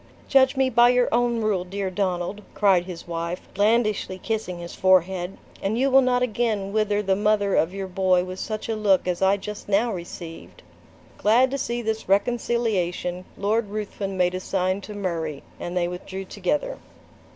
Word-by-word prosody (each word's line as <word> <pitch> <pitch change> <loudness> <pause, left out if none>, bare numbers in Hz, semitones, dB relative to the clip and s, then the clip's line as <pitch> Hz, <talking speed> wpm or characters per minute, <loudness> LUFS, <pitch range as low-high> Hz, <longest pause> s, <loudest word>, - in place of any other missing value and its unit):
"Judge 265 0 +4
me 265 0 +3
by 240 -1 +5
your 250 0 +3
own 240 -1 +2
rule, 205 -4 +1
dear 190 +1 -4
Donald," 185 +1 -2
cried 190 -4 +4
his 180 -2 -8
wife, 170 +1 -4
blandishly 210 -2 +1
kissing 215 -3 -3
his 170 0 -8
forehead, 185 0 +2 0.2
"and 205 +3 -1
you 270 +2 +2
will 270 +1 +7
not 250 -1 +2
again 215 -4 -1
wither 210 -1 +1
the 190 -1 +2
mother 205 -1 +2
of 160 - +2
your 195 0 -4
boy 185 -1 +2
with 185 +1 -7
such 215 -1 -4
a 225 - -1
look 200 -4 +2
as 180 0 -1
I 195 +1 +4
just 210 +1 -8
now 220 +4 +2
received!" 170 -2 -9 0.6
Glad 245 +5 +4
to 275 - -1
see 240 -1 -2
this 220 -3 -3
reconciliation, 195 -5 0
Lord 215 +2 0
Ruthven 200 -2 -4
made 180 0 +2
a 185 - -2
sign 185 +1 -1
to 210 +1 -8
Murray, 165 -7 -3 0.2
and 175 +1 -4
they 175 -1 +1
withdrew 190 +2 -6
together. 250 - -2
200 Hz, 175 wpm, -24 LUFS, 185-220 Hz, 0.6 s, will